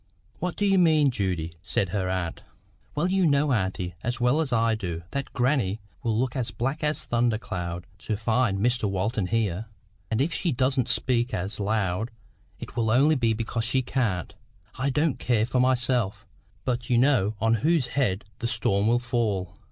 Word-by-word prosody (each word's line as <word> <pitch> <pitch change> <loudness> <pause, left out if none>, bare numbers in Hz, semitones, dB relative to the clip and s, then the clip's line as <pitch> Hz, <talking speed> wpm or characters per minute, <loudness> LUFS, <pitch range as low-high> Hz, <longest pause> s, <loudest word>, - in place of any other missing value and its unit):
"What 180 -1 -2
DO 205 - 0
you 195 -1 +4
mean, 155 -5 +4
Judy?" 90 -7 -2
said 95 +1 0
her 95 0 -1
aunt. 90 -3 -2 0.5
"Well 150 +4 +1
you 190 -1 +3
know, 140 -1 +3
auntie, 95 -4 -1
as 120 +2 -2
well 125 +6 +3
as 145 -5 -2
I 115 -1 +3
do, 85 -6 -4
that 140 -1 -3
grannie 120 -6 +1 0.2
will 115 -4 0
look 125 +2 0
as 125 -4 -1
black 130 +8 -3
as 150 0 0
a - - -27
thunder 120 -2 +2
cloud 90 -4 -5
to 105 0 -3
find 110 -1 +1
Mr 120 0 +1
Walton 100 +1 -1
here; 110 -1 -1 0.4
and 110 - 0
if 155 +5 +1
she 175 - 0
doesn't 130 0 +1
speak 125 -1 +1
as 95 +5 -4
loud, 105 0 0 0.5
it - - -9
will 115 -2 +1
only 135 +7 +5
be 120 -6 +2
because 115 +1 -2
she 130 +2 +2
can't. 115 -9 -1 0.4
I 135 +3 -1
don't 150 +1 +1
care 115 -3 +2
for 125 +1 0
myself, 125 -4 +1 0.4
but 120 -1 -2
you 120 - +4
know 120 -5 +3
on 115 +1 +3
whose 155 -5 +2
head 105 -8 0
the 115 - -1
storm 105 -3 +1
will 120 +1 +4
fall. 110 -7 -1
120 Hz, 185 wpm, -26 LUFS, 100-130 Hz, 0.5 s, only